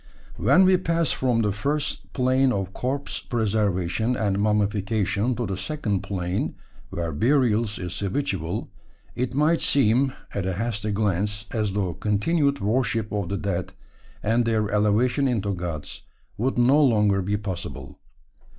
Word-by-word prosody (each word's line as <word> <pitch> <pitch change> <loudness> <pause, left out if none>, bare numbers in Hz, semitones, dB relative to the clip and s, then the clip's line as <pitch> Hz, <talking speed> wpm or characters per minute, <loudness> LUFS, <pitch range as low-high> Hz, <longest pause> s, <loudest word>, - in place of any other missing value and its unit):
When 190 +1 +5
we 185 0 +5
pass 170 -2 0
from 120 -3 +1
the 105 - +1
first 140 +9 -2
plane 130 0 +2
of 95 -3 -2
corpse 135 +3 -2
preservation 110 -1 0
and 100 -4 0
mummification 105 +2 +1
to 120 +1 -2
the 95 -3 -3
second 105 -3 -2
plane, 90 -1 -2 0.3
where 85 -1 -3
burial 120 - +3
is 90 -5 -5
habitual, 100 - -2 0.4
it 125 +1 -2
might 155 +3 +3
seem, 130 0 +3 0.2
at 95 -2 -2
a 95 - 0
hasty 105 +1 -2
glance, 105 +1 0
as 105 -4 -1
though 95 -4 -1
continued 140 - +1
worship 115 0 0
of 100 -4 -2
the 100 - -1
dead, 95 -2 -3 0.5
and 115 +2 +2
their 110 -2 +1
elevation 110 +6 +2
into 105 -5 0
gods, 85 -4 -5 0.3
would 125 +5 -1
no 135 +5 +5
longer 105 -6 +3
be 100 +3 -1
possible. 95 -4 -6
105 Hz, 140 wpm, -24 LUFS, 100-125 Hz, 0.5 s, When